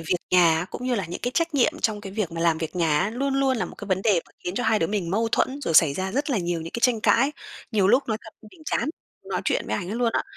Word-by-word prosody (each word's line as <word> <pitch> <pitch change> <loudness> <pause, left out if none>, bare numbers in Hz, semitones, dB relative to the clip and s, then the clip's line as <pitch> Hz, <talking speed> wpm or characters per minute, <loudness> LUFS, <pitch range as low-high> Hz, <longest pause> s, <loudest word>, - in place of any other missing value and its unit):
việc 165 +2 0
nhà 170 -3 +5
á, 175 - -3
cũng 250 - -6
như 255 - +1
là 200 -5 -1
những 170 - -6
cái 245 - 0
trách 335 -2 0
nhiệm 265 -4 +3
trong 215 -2 0
cái 195 -2 -8
việc 200 -5 -2
mà 165 - -4
làm 165 -1 +2
việc 160 +2 -5
nhà 160 -4 +2
á, 200 - 0
luôn 270 +4 -1
luôn 270 -2 +2
là - - -1
một - - -9
cái 205 - -7
vấn 190 0 0
đề 200 -6 +3
mà - - -22
khiến 180 - -3
cho 245 - -1
hai 220 -1 +3
đứa 165 - +1
mình 190 -3 -2
mâu 225 +4 +1
thuẫn, 275 +2 +1
rồi 165 - -1
xảy 155 -3 +6
ra 190 +2 -3
rất 285 +5 -1
là 245 - +1
nhiều 175 -2 -2
những 165 +1 -7
cái 235 - -4
tranh 240 -3 +3
cãi. 275 +6 +3 0.4
Nhiều 205 -5 +2
lúc 260 +5 +3
nói 220 - 0
thật 220 - -12 0.2
mình 320 - -17
chán 305 - -1 0.4
nói - - -1
chuyện - - 0
với - - -2
anh 180 -3 -5
ấy 215 - -3
luôn 235 -1 +1
á - - +1
205 Hz, 325 wpm, -24 LUFS, 175-245 Hz, 0.4 s, xảy